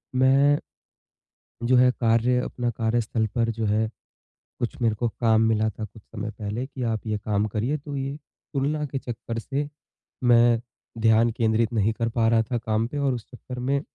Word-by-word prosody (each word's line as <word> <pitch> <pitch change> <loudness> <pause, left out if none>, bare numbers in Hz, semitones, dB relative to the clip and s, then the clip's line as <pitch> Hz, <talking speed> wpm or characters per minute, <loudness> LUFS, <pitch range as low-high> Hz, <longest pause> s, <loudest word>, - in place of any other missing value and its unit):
मैं 135 +3 +5 1.1
जो 130 +1 +4
है 125 0 +6
कार्य 115 +1 +3
अपना 120 -1 -2
कार्यस्थल 115 0 0
पर 115 -1 +2
जो 110 -1 -2
है 110 +1 +1 0.7
कुछ 120 - -2
मेरे 115 -2 +2
को 120 +3 0
काम 110 -1 +4
मिला 110 0 +2
था 110 +1 -7
कुछ 105 +2 -15
समय 110 +1 -6
पहले 110 +4 -3
कि 130 -3 -6
आप 115 -1 -2
ये 105 -1 0
काम 105 0 0
करिए, 115 +8 -1
तो 145 0 -7
ये 135 +1 -3 0.4
तुलना 150 +2 0
के 135 0 -4
चक्कर 115 -1 -5
से 145 +5 -3 0.5
मैं 120 -1 +5 0.4
ध्यान 115 +1 +4
केंद्रित 115 0 +1
नहीं 110 0 +2
कर 115 +1 -1
पा 115 -1 +1
रहा 115 -1 +4
था 120 - +2
काम 110 0 0
पे 145 - -6
और 140 -2 +1
उस 120 -3 -5
चक्कर 125 0 -8
में 135 +3 0
115 Hz, 185 wpm, -25 LUFS, 110-130 Hz, 1.1 s, है